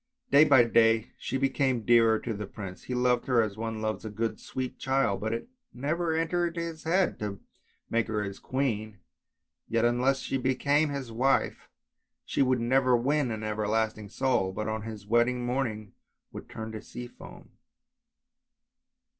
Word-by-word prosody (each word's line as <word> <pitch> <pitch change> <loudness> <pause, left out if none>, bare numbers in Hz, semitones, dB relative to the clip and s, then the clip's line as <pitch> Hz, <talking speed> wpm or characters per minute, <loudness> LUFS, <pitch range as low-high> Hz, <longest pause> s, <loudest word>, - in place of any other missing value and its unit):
Day 145 +2 +8
by 135 -5 +7
day 115 -1 +3
she - - -2
became 135 -3 +1
dearer 115 -2 +5
to 115 - -3
the 105 -1 -5
prince, 95 -3 -8
he 125 - -3
loved 125 0 +2
her 125 -3 +3
as 105 -2 -4
one 110 0 -4
loves 110 0 -2
a 110 - -5
good 110 +1 -3
sweet 130 -1 -5
child, 135 -7 +1
but 110 +1 -1
it 115 - -3 0.3
never 160 +5 -1
entered 170 +1 0
his 165 -2 -5
head 185 +4 +1
to 100 -2 -4 0.5
make 115 0 0
her 105 -2 -1
his 100 -1 -6
queen; 110 -6 -2 0.7
yet 115 0 +1
unless 125 +3 +2
she 135 - -2
became 140 +4 +2
his 140 -4 -5
wife 130 +4 +1 0.6
she - - -1
would 130 -2 +3
never 125 +1 +3
win 140 +2 +1
an 110 -1 -4
everlasting 110 0 -1
soul, 120 -5 +1
but 105 +3 -4
on 110 0 -2
his 110 -2 -8
wedding 120 +3 +2
morning 115 -5 -2 0.4
would - - -9
turn 110 0 -6
to 110 -1 -6
sea 125 0 -8
foam. - - -13
120 Hz, 165 wpm, -28 LUFS, 110-135 Hz, 0.7 s, Day